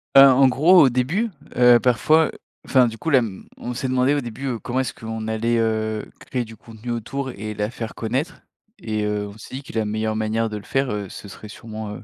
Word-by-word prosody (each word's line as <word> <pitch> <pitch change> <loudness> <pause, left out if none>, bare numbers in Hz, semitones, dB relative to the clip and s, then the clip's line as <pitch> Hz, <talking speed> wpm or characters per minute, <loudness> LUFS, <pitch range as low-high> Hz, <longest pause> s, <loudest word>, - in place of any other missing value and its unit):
Heu, 135 - +11
en 135 0 +7
gros, 160 +8 +5
au 135 - +6
début, 155 - 0 0.3
heu, 125 -1 +7
parfois, 155 +7 +3 0.3
enfin 130 -3 +4
du 115 - -6
coup 160 - -3
là, 130 -4 +5
mmh, 105 -5 -6
on 125 - -5
s'est 130 - -3
demandé 130 +2 +2
au 145 - 0
début 120 0 -4
comment 130 +1 -2
est-ce 130 - -1
qu'on 110 -1 -6
allait, 115 +2 0
heu, 110 -1 -1
créer 125 -3 -3
du 110 0 -12
contenu 115 +2 -9
autour 130 +3 -3
et 105 0 -6
la 105 0 -2
faire 115 -1 -6
connaître 125 +8 -3 0.4
et, 110 - -2
heu, 105 -1 -2
on 100 +1 -11
s'est 130 - -9
dit 135 - -6
que 155 - -11
la 110 - +1
meilleure 110 +1 -1
manière 110 +1 0
de 105 - -4
le 100 - -9
faire, 135 +5 0
heu, 105 -2 -4
ce 100 - -9
serait 105 +2 -11
sûrement, 110 -1 -7
heu, - - -10
115 Hz, 235 wpm, -22 LUFS, 110-130 Hz, 0.4 s, Heu